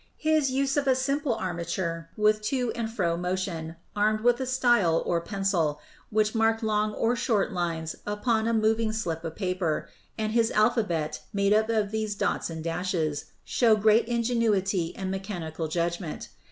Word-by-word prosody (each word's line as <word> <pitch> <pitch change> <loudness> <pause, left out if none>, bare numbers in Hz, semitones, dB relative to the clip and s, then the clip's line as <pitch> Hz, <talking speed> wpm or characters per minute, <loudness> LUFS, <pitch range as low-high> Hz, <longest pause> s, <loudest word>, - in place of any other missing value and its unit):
His 310 -3 +2
use 275 +2 0
of 280 -1 +1
a 260 - +5
simple 275 -1 0
armature 170 -2 -3
with 215 0 +3
to 250 -3 0
and 230 -2 -3
fro 175 -7 0
motion, 175 -2 -3 0.2
armed 215 +1 +2
with 240 +1 +3
a 260 - -2
style, 240 -10 +3
or 170 -1 +1
pencil, 175 -6 0 0.3
which 215 0 +1
marked 225 0 +2
long 215 -1 +1
or 235 +2 +1
short 225 -4 +1
lines 165 -3 -2
upon 220 +2 0
a 230 - +1
moving 220 0 +2
slip 170 -7 -3
of 165 -1 -5
paper, 180 -5 -1 0.3
and 215 -1 -1
his 225 0 +3
alphabet 210 -8 +1
made 200 0 +3
up 220 +1 +3
of 215 -3 +1
these 215 -1 -2
dots - - -1
and 160 -1 -6
dashes, 165 -3 -1 0.2
show 230 -3 +4
great 215 +2 +4
ingenuity 220 -7 +1
and 190 -1 -3
mechanical 175 -5 -4
judgment. 170 0 -3
210 Hz, 165 wpm, -27 LUFS, 170-225 Hz, 0.3 s, a